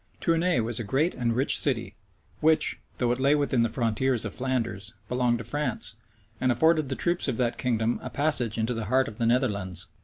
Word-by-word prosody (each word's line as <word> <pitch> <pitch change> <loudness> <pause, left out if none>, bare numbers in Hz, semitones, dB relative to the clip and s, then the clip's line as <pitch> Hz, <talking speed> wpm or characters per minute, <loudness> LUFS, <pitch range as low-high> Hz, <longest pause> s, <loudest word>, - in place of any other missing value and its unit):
Tournay 165 -2 +2
was 115 +1 -3
a - - -2
great 140 - +1
and 120 -2 -1
rich 135 +4 +3
city, 125 -5 -1 0.5
which, 160 0 +3 0.2
though 120 -1 +1
it 120 - -1
lay 140 +2 +4
within 140 -4 +1
the 115 - +2
frontiers 115 +1 0
of 110 - -4
Flanders, 120 -5 -2
belonged 125 -1 +1
to 115 - -6
France, 145 -3 -1 0.5
and 130 -1 +2
afforded 155 +3 +3
the 135 - -2
troops 175 +2 +1
of 130 -4 -1
that 120 -2 -1
kingdom 115 -2 0
a - - -6
passage 140 -7 0
into 115 +2 0
the 115 -2 -3
heart 130 +5 +2
of 105 - -9
the 115 - +1
Netherlands. 100 -7 0
125 Hz, 205 wpm, -27 LUFS, 115-135 Hz, 0.5 s, lay